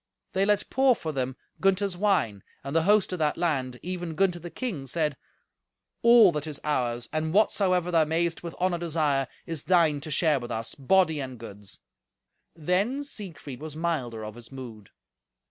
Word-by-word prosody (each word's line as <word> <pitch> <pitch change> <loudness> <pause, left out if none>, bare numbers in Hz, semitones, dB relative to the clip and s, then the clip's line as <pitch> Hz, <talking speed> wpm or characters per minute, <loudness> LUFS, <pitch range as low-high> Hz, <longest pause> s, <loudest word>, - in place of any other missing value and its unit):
They 190 +1 +2
let 210 -1 +2
pour 265 -1 +4
for 160 -6 -4
them 130 -2 -2 0.2
Gunther's 195 0 +2
wine, 175 - +1 0.2
and 140 +3 -5
the 165 - +5
host 210 -2 +4
of 180 - -3
that 150 -1 +1
land, 135 -8 -1
even 175 -2 -4
Gunther 180 0 +2
the 175 +1 -8
king, 175 - -4
said, 150 0 0 0.9
"All 235 -5 +7
that 150 -1 -3
is 150 -2 -5
ours, 120 -5 -1
and 155 +1 -1
whatsoever 185 -4 +2
thou 165 -2 +4
mayest 165 +2 0
with 170 -1 -7
honour 180 -1 0
desire, 150 -5 0 0.2
is 165 -4 -4
thine 165 -5 +3
to 155 - -7
share 155 -1 +2
with 120 -1 -7
us, 115 -1 -3
body 160 +2 +2
and 130 -2 -5
goods." 105 -3 -9 0.7
Then 190 - 0
Siegfried 175 - -8
was 155 -1 -7
milder 135 -10 -2
of 105 - -7
his 120 +1 -12
mood. 120 -7 -9
160 Hz, 175 wpm, -27 LUFS, 135-185 Hz, 0.9 s, All